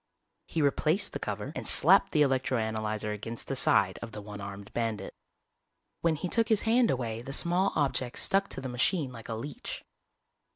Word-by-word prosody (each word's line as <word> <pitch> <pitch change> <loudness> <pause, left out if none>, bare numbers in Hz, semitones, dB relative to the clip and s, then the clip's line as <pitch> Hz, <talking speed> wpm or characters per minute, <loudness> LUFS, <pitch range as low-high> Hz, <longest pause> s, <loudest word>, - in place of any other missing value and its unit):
He 160 - -1
replaced 155 +6 +1
the - - -3
cover - - -4
and - - -4
slapped - - +6
the 150 -2 +4
electro 130 -2 +1
analyzer 110 -1 -2
against 110 +2 -6
the - - -2
side - - +3
of 115 -1 -8
the 105 - -6
one 105 0 -8
armed 100 0 -8
bandit. 110 -4 -3 0.9
When 165 -1 +1
he 170 - -3
took 225 +4 +1
his 220 -2 +3
hand 230 +1 +3
away 115 -3 -2
the 135 +3 -7
small 180 +6 +2
object 135 -4 0
stuck 195 0 +2
to - - -5
the 130 - -4
machine 130 +4 0
like 115 -2 -11
a 115 - -2
leech. 135 +6 -6
130 Hz, 190 wpm, -29 LUFS, 110-160 Hz, 0.9 s, slapped